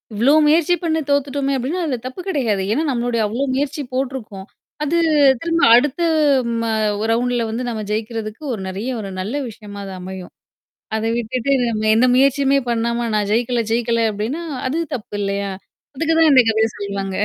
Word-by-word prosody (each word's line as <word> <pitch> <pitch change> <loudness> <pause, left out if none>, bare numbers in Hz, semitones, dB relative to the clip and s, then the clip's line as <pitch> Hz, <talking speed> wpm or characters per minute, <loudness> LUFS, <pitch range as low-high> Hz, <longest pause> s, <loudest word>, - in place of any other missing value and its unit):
இவ்ளோ 240 +7 +4
முயற்சி 325 +3 +4
பண்ணு 320 -1 +1
தோத்துட்டோமே 280 -1 0
அப்டின்னா, 275 +9 -2
அந்த 255 - -1
தப்பு 260 +8 -6
கெடையாது. 240 - 0
ஏன்னா, 300 +8 +1
நம்மளுடைய 240 -2 -1
அவ்வளோ 230 +6 -2
முயற்சி 290 +2 -2
போடருக்கோம். 250 -7 -4 0.4
அது 310 +3 +1 0.4
திரும்ப 335 0 0
அடுத்து 290 +7 +2 0.6
ம 230 - -2 0.5
ரவுண்ட்ல 240 0 +1
வந்து 230 +3 -3
நம்ம 220 -2 -4
ஜெயிக்கிறதுக்கு 220 +2 -4
ஒரு 210 - -5
நெறைய 195 +6 -4
ஒரு 200 -2 -5
நல்ல 205 +8 -3
விஷயமா 205 -2 -10
அது 195 - -7
அமையும். 185 0 -8 0.6
அத 220 - -2
விட்டுட்டு 240 +3 -2 0.2
நம்ம 215 -1 -1
எந்த 235 +3 +4
முயற்சியுமே 275 +1 +3
பண்ணாம 235 0 0
நான் 205 -1 0
ஜெயிக்கல, 235 +1 +1
ஜெயிக்கல 230 0 +1
அப்படின்னா, 230 +11 -3 0.2
அது 305 +6 -1 0.2
தப்பு 210 -3 -8
இல்லையா? 200 0 -2 0.4
அதுக்கு 325 +4 0
தான் 320 -1 +6
இந்த 260 -2 +8
கதைய 220 0 +2
சொல்லுவாங்க. 200 -1 -4
240 Hz, 160 wpm, -20 LUFS, 215-275 Hz, 0.6 s, இந்த